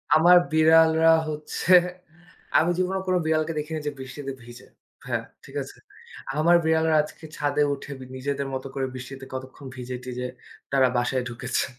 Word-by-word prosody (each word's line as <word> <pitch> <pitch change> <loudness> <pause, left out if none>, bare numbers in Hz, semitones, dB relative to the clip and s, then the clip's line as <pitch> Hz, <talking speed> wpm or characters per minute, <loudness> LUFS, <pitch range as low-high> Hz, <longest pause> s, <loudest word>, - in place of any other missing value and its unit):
আমার 175 +3 +7
বিড়ালরা 160 +1 +5 0.2
হচ্ছে। 155 +4 -1 0.8
আমি 165 - +3
জীবনেও 185 +1 0
কোন 185 - +2
বিড়ালকে 155 0 +1
দেখিনি 155 +1 -4
যে - - 0
বৃষ্টিতে 135 +1 -6
ভিজে। 120 +1 -13 0.4
ভাইয়া - - -2 0.2
ঠিক - - -13
আছে? - - -9 0.6
আমার 170 +3 +5
বিড়ালরা 160 0 +3
আজকে 155 +2 -11
ছাদে 145 0 +1
উঠে 140 +1 -8 0.3
নিজেদের 140 +1 -3
মতো 130 0 -4
করে 135 -1 -1
বৃষ্টিতে 130 +1 -8
কতক্ষণ 130 +2 -8
ভিজে-টিজে 125 0 -5 0.4
তারা 135 -1 +4
বাসায় 125 +1 0
ঢুকেছে। 120 +1 -2
145 Hz, 145 wpm, -25 LUFS, 130-160 Hz, 0.8 s, আমার